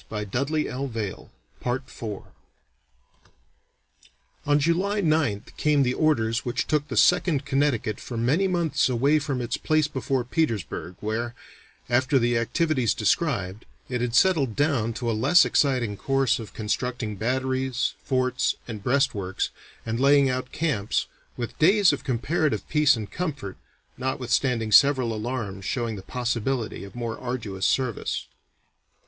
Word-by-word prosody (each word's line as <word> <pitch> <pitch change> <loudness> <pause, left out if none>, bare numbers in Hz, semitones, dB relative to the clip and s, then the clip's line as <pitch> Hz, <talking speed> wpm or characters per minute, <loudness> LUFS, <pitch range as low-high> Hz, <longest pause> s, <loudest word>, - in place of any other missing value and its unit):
[Illustration: 130 +9 -1
Colonel 115 -7 -4 0.4
Wessells] 120 -5 -4 2.2
On 145 0 +4
July 180 +7 +1
9th 155 - 0
came 150 -2 +3
the 125 -1 +1
orders 120 -7 +1
which 120 - -1
took 150 -1 0
the - - -4
Second 165 -6 +3
Connecticut 135 -6 0
for 120 - -6
many 145 +12 +2
months 170 -7 +1
away 140 +5 +3
from 140 -3 -3
its 120 - -2
place 155 -1 +1
before 135 -2 -1
Petersburg, 115 - -2
where, 115 +3 -3 0.5
after 130 +3 +2
the 120 -1 +2
activities 130 - +1
described, 95 +5 0 0.3
it 125 -1 -2
had 120 -1 -1
settled 145 - +3
down 140 -7 +1
to 120 +1 -4
a 115 - +1
less 175 +11 +5
exciting 125 -7 +1
course 135 +4 +1
of 110 - -9
constructing 115 0 -2
batteries, 130 +3 -1
forts, 130 -1 0
and 110 -4 -6
breastworks, 115 -8 0 0.3
and 115 +1 -2
laying 140 0 +5
out 130 0 -4
camps, 140 -11 -1 0.3
with 120 -1 -5
days 195 +3 +5
of - - -4
comparative 140 +5 -1
peace 150 -2 +4
and 105 -3 -6
comfort 140 - -4 0.4
notwithstanding 125 -3 0
several 130 -3 +5
alarms 110 -4 -4
showing 115 +1 -2
the 95 - -7
possibility 120 +1 -2
of 100 - -11
more 115 -2 -4
arduous 110 -7 -2
service. 130 -5 -1
125 Hz, 130 wpm, -25 LUFS, 115-145 Hz, 2.2 s, less